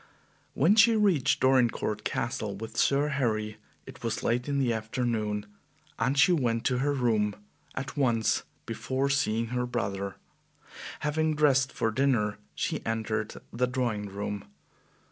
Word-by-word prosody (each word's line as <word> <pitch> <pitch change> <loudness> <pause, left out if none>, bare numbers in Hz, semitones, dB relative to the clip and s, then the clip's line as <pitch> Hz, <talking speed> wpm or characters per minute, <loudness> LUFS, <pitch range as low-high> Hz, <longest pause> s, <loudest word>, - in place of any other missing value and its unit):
When 165 +9 +5
she 225 +1 +6
reached 195 -11 +2
Dorincourt 120 -5 +2
Castle 110 -5 -2
with 110 +2 -7
Sir 140 +4 +3
Harry, 110 -6 -1 0.3
it - - -12
was - - -2
late 125 +4 0
in 140 - 0
the 130 -4 +2
afternoon, 110 -2 -2 0.5
and 125 +5 +1
she 140 - +6
went 120 -8 +1
to 125 -1 +2
her 145 +2 +1
room 110 -6 +1 0.4
at 130 0 -4
once 120 -6 +2 0.2
before 135 +1 -1
seeing 115 -5 +1
her 125 0 -1
brother. 100 -5 -3 0.9
Having 155 +1 +1
dressed 135 -3 +3
for 115 - 0
dinner, 115 -4 +1 0.2
she - - -2
entered 110 -1 -2 0.2
the 125 +2 +1
drawing 120 -5 -1
room. 100 0 -5
120 Hz, 140 wpm, -28 LUFS, 110-140 Hz, 0.9 s, she